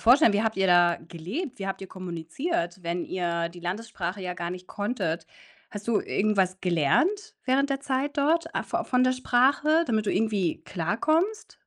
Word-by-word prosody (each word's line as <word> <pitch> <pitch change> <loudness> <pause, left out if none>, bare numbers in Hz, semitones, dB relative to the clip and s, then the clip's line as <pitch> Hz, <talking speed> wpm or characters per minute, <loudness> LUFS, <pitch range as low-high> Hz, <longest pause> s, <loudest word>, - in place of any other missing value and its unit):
vorstellen? 245 0 +6
Wie 205 +1 +2
habt 220 -2 0
ihr 195 - +2
da 175 -1 +5
gelebt? 190 - -5
Wie 195 - -4
habt 195 0 -4
ihr - - -6
kommuniziert, 175 - -4
wenn 170 +1 -2
ihr 170 -2 -2
die 175 0 -12
Landessprache 190 0 -4
ja 180 -1 -3
gar 175 -1 -4
nicht 180 0 -7
konntet? 190 -7 -2 0.4
Hast 205 0 -8
du 225 -3 +3
irgendwas 195 -3 +1
gelernt 180 - +1
während 275 +2 +2
der 275 -1 -1
Zeit 275 +1 -1
dort 325 +3 +1
a - - 0
vo - - -2
von 255 0 +2
der 255 - +3
Sprache, 275 +6 +3
damit 215 -2 0
du - - +2
irgendwie 205 -7 0
klarkommst? 310 - 0
205 Hz, 180 wpm, -27 LUFS, 175-260 Hz, 0.4 s, vorstellen